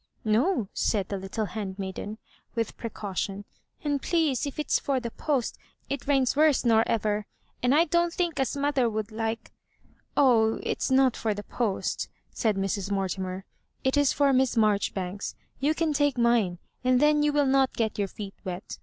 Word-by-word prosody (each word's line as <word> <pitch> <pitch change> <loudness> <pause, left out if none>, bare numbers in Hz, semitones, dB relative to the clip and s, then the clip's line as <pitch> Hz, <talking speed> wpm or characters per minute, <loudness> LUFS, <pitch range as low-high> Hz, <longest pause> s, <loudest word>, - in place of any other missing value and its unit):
'* - - -38
No," 230 - +2
said 200 -4 0
the 200 - -2
little 195 +3 -3
handmaiden, 195 +1 -5 0.4
with 230 -2 -2
pre 230 - -5
caution; 200 -1 -4 0.2
" - - -37
and, 290 -2 0
please, 310 -6 +1
if 280 - -7
it's 300 - +1
for 275 -2 0
the 235 -2 -5
post, 275 -3 -1 0.3
it 280 - -3
rains 270 -3 +3
worse 300 -3 +4
nor 225 -1 +5
ever; 210 -1 0 0.3
and 250 +3 +3
I 330 +3 +5
don't 345 +1 +2
think 345 -3 -1
as 270 +2 0
mother 280 -4 +2
would 215 0 -3
like 225 +1 -3 0.4
^" - - -31
*' - - -39
Oh, 225 -5 +4
it - - -2
is - - 0
not 260 -1 +4
for 215 -2 -1
the 205 - -6
post," 220 -4 -2 0.2
said 220 -4 0
Mrs. 195 0 -1
Morti 195 -1 -1
mer 185 0 -3
• - - -31 0.2
" - - -44
it 265 +1 +2
is 285 -2 +4
for 280 -1 +3
Miss 260 -2 +2
Marjoribanks. 200 -3 0 0.2
You 295 +4 +2
can 325 -2 +1
take 290 -2 +2
mine, 235 -7 +3 0.3
and 255 0 +4
then 300 +1 +4
you 295 0 +3
will 290 -1 +3
not 265 0 +3
get 220 -2 -1
your 200 - +1
feet 195 0 -8
wet. 180 0 -6
235 Hz, 200 wpm, -27 LUFS, 205-280 Hz, 0.4 s, nor